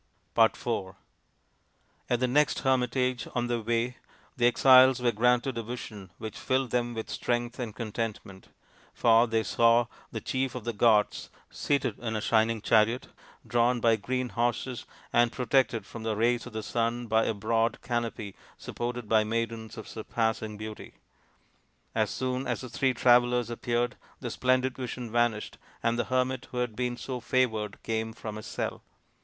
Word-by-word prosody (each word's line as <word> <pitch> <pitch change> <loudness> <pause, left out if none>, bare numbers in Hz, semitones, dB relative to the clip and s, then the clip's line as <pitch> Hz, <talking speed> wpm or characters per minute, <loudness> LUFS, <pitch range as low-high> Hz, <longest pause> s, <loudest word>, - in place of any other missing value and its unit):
IV 115 -4 +1 1.1
At 120 - +2
the 130 - +3
next 145 +4 +2
hermitage 130 -1 +1
on 120 -1 +1
their 120 -1 -1
way 120 +3 -1 0.4
the 120 -1 +4
exiles 130 +1 +7
were 125 -1 +2
granted 125 +2 +2
a - - -1
vision 110 -4 -7
which 110 -1 -7
filled 130 -1 0
them 120 -1 0
with 110 - -4
strength 120 0 -2
and 115 -4 -4
contentment; 110 -4 -5 0.5
for 115 +1 +5
they 115 -1 +1
saw 115 +3 +4 0.3
the 110 - -4
chief 130 +2 -2
of 125 - -5
the 120 +1 -2
gods 105 -1 +2 0.2
seated 140 -2 -1
in 110 -2 -3
a - - 0
shining 110 0 +2
chariot 115 +3 +3 0.4
drawn 120 +1 +2
by 115 -1 +4
green 125 +4 -2
horses 120 +1 -2 0.3
and 120 0 +4
protected 125 -2 +1
from 115 - -9
the 110 -1 -1
rays 120 +2 +1
of 120 - -11
the 110 0 -4
sun 120 +2 -1
by 110 0 +2
a - - 0
broad 115 +2 0
canopy 115 -5 -3 0.2
supported 120 -1 -5
by 110 0 +4
maidens 115 0 -3
of 110 - -8
surpassing 110 -1 -2
beauty. 110 0 -8 1.0
As - - +1
soon 130 +1 -2
as - - -2
the 125 - -7
three 130 +2 +1
travellers 120 0 +4
appeared 120 +1 -1 0.2
the - - -5
splendid 130 0 +1
vision 125 -2 -5
vanished, 120 -2 0 0.2
and 115 +1 +1
the - - +1
hermit 130 0 -1
who 125 - -7
had 125 -3 -1
been 125 0 -2
so 130 0 -5
favoured 110 -4 0
came 110 0 -2
from 110 -1 -7
his 110 - -8
cell. - - -4
120 Hz, 160 wpm, -28 LUFS, 110-125 Hz, 1.1 s, exiles